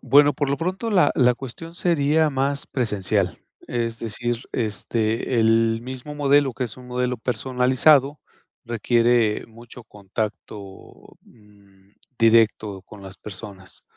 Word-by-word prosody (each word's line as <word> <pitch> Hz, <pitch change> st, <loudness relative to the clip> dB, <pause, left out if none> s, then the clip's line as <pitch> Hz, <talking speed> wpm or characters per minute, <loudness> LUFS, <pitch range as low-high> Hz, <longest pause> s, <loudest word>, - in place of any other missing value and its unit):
Bueno, 145 Hz, +1 st, +5 dB
por 145 Hz, +1 st, -2 dB
lo 140 Hz, -, 0 dB
pronto, 185 Hz, +7 st, -3 dB
la 185 Hz, -4 st, +4 dB
la 125 Hz, -2 st, +4 dB
cuestión 135 Hz, +7 st, -9 dB
sería 155 Hz, -3 st, +2 dB
más 140 Hz, +1 st, -1 dB
presencial, 100 Hz, -, -1 dB, 0.3 s
es 115 Hz, -1 st, -2 dB
decir, 120 Hz, +2 st, -3 dB
este, 115 Hz, +1 st, -1 dB
el 115 Hz, 0 st, +3 dB
mismo 130 Hz, +3 st, -7 dB
modelo, 145 Hz, -2 st, +3 dB
que 130 Hz, -, -2 dB
es 115 Hz, -, -8 dB
un 125 Hz, -1 st, -13 dB
modelo 125 Hz, 0 st, -1 dB
personalizado, 130 Hz, +4 st, +2 dB, 0.5 s
requiere 120 Hz, -1 st, +2 dB
mucho 115 Hz, +1 st, -14 dB
contacto, 105 Hz, -1 st, -7 dB
mm, 100 Hz, -3 st, -23 dB, 0.3 s
directo 110 Hz, -4 st, +3 dB
con 100 Hz, +1 st, -14 dB
las 95 Hz, 0 st, -10 dB
personas. 100 Hz, -2 st, -10 dB
120 Hz, 125 wpm, -23 LUFS, 105-135 Hz, 0.5 s, Bueno